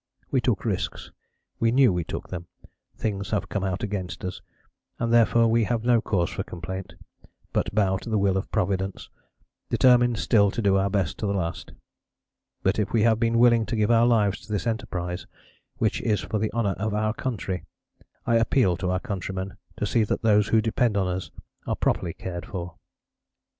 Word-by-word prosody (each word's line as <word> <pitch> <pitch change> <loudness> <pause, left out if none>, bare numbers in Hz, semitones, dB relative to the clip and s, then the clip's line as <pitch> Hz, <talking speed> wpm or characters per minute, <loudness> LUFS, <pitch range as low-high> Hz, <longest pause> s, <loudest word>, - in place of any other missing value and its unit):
We - - +2
took - - 0
risks, - - -3 0.5
we 115 0 +3
knew 130 -4 +5
we 90 -1 -1
took - - -6
them; 90 -1 -6 0.5
things 100 -3 -2
have 100 -4 -1
come 95 +2 -2
out 95 +3 -2
against 95 -4 -4
us, 90 - -5 0.6
and 115 0 0
therefore 115 0 +5
we 115 0 +3
have 115 0 -1
no 120 -1 +4
cause 90 -6 0
for - - -3
complaint, 95 +2 -6 0.6
but 105 - -1
bow 95 -3 +3
to 115 - -8
the 110 - +1
will 100 -1 +2
of 95 - -3
Providence, 95 +1 -2 0.6
determined 120 -2 +4
still 100 -2 +3
to 95 - -4
do 100 -3 +3
our 95 0 +2
best 95 -4 -1
to 105 - -1
the 100 - 0
last. 85 -3 -4 0.9
But 95 +3 +2
if 105 - -1
we 110 -2 +3
have 115 -1 +3
been 115 0 +2
willing 120 -1 +5
to 115 - -2
give 105 0 +2
our 115 0 +5
lives 105 -4 +2
to - - -9
this 100 -3 -1
enterprise, 90 -6 -3 0.5
which - - 0
is 105 -3 +1
for 110 - -2
the 110 +1 -1
honour 110 -4 0
of 110 0 -1
our 110 0 +1
country, 100 -8 -3 0.6
I 115 - +3
appeal 115 -5 +2
to 95 -1 -2
our 90 0 +1
countrymen 95 -3 -4 0.2
to - - -1
see 115 - +2
that 105 - -2
those 105 -2 +4
who 110 0 +3
depend 115 -1 +1
on 95 - +2
us 90 0 -3 0.4
are - - 0
properly 85 -3 0
cared 90 -1 -6
for. 90 -2 -5
105 Hz, 195 wpm, -25 LUFS, 95-115 Hz, 0.9 s, knew